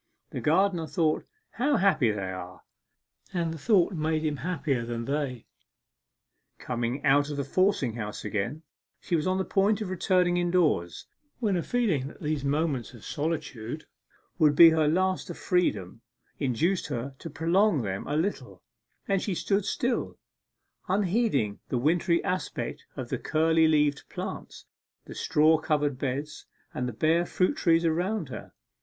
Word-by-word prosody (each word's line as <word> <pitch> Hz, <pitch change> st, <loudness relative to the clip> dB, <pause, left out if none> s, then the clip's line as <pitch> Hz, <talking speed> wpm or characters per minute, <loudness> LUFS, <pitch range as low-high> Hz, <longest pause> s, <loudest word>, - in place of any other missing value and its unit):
The -, -, -4 dB
gardener 170 Hz, +1 st, +2 dB
thought 160 Hz, -2 st, 0 dB, 0.2 s
'How 280 Hz, +4 st, +1 dB
happy 155 Hz, -, +3 dB
they 100 Hz, -3 st, -2 dB
are!' 90 Hz, -1 st, -8 dB, 0.7 s
and 165 Hz, -2 st, 0 dB
the 160 Hz, -, -8 dB
thought 200 Hz, 0 st, +3 dB
made 155 Hz, -1 st, -1 dB
him 150 Hz, -2 st, -1 dB
happier 145 Hz, -7 st, -1 dB
than 115 Hz, 0 st, -4 dB
they. 135 Hz, -3 st, -2 dB, 1.1 s
Coming 120 Hz, +3 st, -3 dB
out 145 Hz, +1 st, +4 dB
of 145 Hz, -, -4 dB
the 140 Hz, -, -1 dB
forcing 165 Hz, -, +1 dB
house 105 Hz, -2 st, -6 dB
again, 115 Hz, +10 st, -3 dB, 0.4 s
she 175 Hz, -, -1 dB
was 155 Hz, +1 st, 0 dB
on 185 Hz, 0 st, +1 dB
the 190 Hz, -, -1 dB
point 200 Hz, +2 st, +2 dB
of 205 Hz, -4 st, -4 dB
returning 180 Hz, -1 st, +2 dB
indoors, 175 Hz, -, +1 dB, 0.3 s
when 210 Hz, -6 st, 0 dB
a 175 Hz, -, +1 dB
feeling 190 Hz, -, 0 dB
that -, -, -12 dB
these 150 Hz, -2 st, -2 dB
moments 140 Hz, -4 st, -1 dB
of 115 Hz, -, -13 dB
solitude 150 Hz, -4 st, -4 dB, 0.5 s
would 150 Hz, -3 st, +5 dB
be 165 Hz, +1 st, +9 dB
her 160 Hz, -1 st, +2 dB
last 185 Hz, +4 st, +1 dB
of -, -, -6 dB
freedom 115 Hz, -, 0 dB, 0.4 s
induced 155 Hz, +8 st, 0 dB
her 135 Hz, -1 st, -4 dB
to 165 Hz, -, -7 dB
prolong 165 Hz, -, +2 dB
them 95 Hz, -2 st, -4 dB
a 145 Hz, -, -1 dB
little, 190 Hz, +6 st, -3 dB, 0.4 s
and 195 Hz, -1 st, +1 dB
she 195 Hz, -, -2 dB
stood 195 Hz, +3 st, 0 dB
still, 240 Hz, +3 st, -1 dB, 0.7 s
unheeding 185 Hz, -, +1 dB
the 125 Hz, -, 0 dB
wintry 170 Hz, +6 st, +2 dB
aspect 185 Hz, -1 st, -3 dB
of -, -, -6 dB
the -, -, -2 dB
curly 160 Hz, +1 st, +3 dB
leaved 150 Hz, -2 st, +1 dB
plants, -, -, -7 dB, 0.4 s
the -, -, -9 dB
straw 155 Hz, +1 st, +3 dB
covered 150 Hz, -4 st, 0 dB
beds, 145 Hz, +3 st, -4 dB, 0.3 s
and 125 Hz, 0 st, -2 dB
the -, -, -4 dB
bare 160 Hz, +8 st, +2 dB
fruit 185 Hz, +1 st, 0 dB
trees 165 Hz, 0 st, +3 dB
around 180 Hz, +7 st, 0 dB
her. -, -, -8 dB
155 Hz, 155 wpm, -27 LUFS, 135-180 Hz, 1.1 s, be